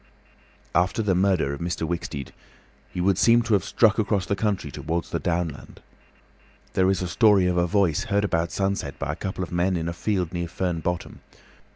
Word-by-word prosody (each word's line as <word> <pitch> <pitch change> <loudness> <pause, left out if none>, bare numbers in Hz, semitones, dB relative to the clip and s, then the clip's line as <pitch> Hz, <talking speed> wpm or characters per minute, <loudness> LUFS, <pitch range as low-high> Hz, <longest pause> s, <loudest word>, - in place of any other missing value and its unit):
After 90 +6 +1
the 100 -3 +2
murder 90 -6 +2
of 70 - -6
Mr. 85 -1 -2
Wicksteed, 80 -5 -4 0.6
he - - -6
would 95 +1 +2
seem 120 +1 +5
to 115 -2 0
have 100 -3 +3
struck 110 +2 +3
across 100 -3 +1
the 100 - 0
country 100 -8 -1
towards 85 +5 -3
the - - -1
downland. 85 -4 -3 0.9
There 95 0 +3
is 95 -1 +1
a - - -2
story 100 0 +4
of 90 -1 +1
a 85 0 +2
voice 95 -5 +1
heard 100 +1 +1
about 85 -3 0
sunset 95 -7 -2
by - - -2
a - - -6
couple 95 -1 -4
of 90 - -7
men 90 +1 +1
in 80 0 -3
a 85 - -2
field 90 -2 -1
near 85 -1 -2
Fern 90 0 -2
Bottom. 90 +2 -4
90 Hz, 200 wpm, -25 LUFS, 85-100 Hz, 0.9 s, seem